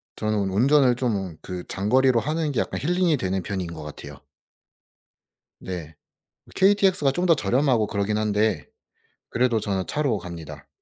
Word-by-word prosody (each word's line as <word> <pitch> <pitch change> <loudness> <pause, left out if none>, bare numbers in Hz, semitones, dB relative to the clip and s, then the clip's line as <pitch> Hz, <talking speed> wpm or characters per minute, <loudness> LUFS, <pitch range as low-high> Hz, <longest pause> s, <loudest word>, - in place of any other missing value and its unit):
저는 105 -2 -1
운전을 125 +5 +4
좀 100 -10 -2
그 90 -1 -6
장거리로 125 +5 +2
하는 155 +3 -1
게 130 - -1
약간 - - -2
힐링이 175 0 +1
되는 95 -4 -2
편인 95 -3 -3
것 80 - -8
같아요. 75 - -9 1.4
네. 85 -4 -7 0.6
KTX가 190 -7 +3
좀 180 +4 -1
더 165 - +6
저렴하고 120 0 +1
그러긴 100 +1 -1
한데 105 -1 0 0.6
그래도 120 -2 +1
저는 95 -3 -2
차로 140 -7 0
갑니다. 85 -3 -9
110 Hz, 295 characters per minute, -24 LUFS, 95-140 Hz, 1.4 s, 더